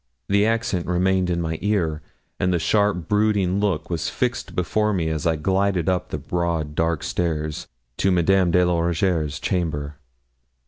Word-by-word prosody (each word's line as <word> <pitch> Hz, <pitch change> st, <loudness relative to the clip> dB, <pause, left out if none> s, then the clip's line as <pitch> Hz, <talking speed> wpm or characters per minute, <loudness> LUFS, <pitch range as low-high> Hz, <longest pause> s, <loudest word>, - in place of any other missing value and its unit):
The 100 Hz, +2 st, +3 dB
accent 115 Hz, -6 st, -1 dB
remained 90 Hz, +1 st, +1 dB
in 85 Hz, -1 st, 0 dB
my 80 Hz, -1 st, -3 dB
ear, 85 Hz, -7 st, 0 dB, 0.4 s
and 90 Hz, -, +1 dB
the 90 Hz, -, +2 dB
sharp 90 Hz, +1 st, +1 dB
brooding 105 Hz, -3 st, +2 dB
look 100 Hz, -5 st, -1 dB
was 85 Hz, -2 st, -1 dB
fixed 125 Hz, 0 st, -2 dB
before 105 Hz, +4 st, +1 dB
me 85 Hz, -4 st, 0 dB
as 80 Hz, 0 st, -1 dB
I 80 Hz, -, +2 dB
glided 95 Hz, +2 st, 0 dB
up 90 Hz, -1 st, 0 dB
the -, -, -3 dB
broad 85 Hz, -4 st, -2 dB
dark 80 Hz, -1 st, 0 dB
stairs 80 Hz, -2 st, -2 dB, 0.3 s
to 95 Hz, -, +2 dB
Madame 90 Hz, +1 st, +3 dB
de 90 Hz, +1 st, +4 dB
la 90 Hz, -1 st, +1 dB
Rougierre's 85 Hz, -3 st, 0 dB
chamber. 75 Hz, -6 st, -2 dB
90 Hz, 165 wpm, -23 LUFS, 80-100 Hz, 0.4 s, de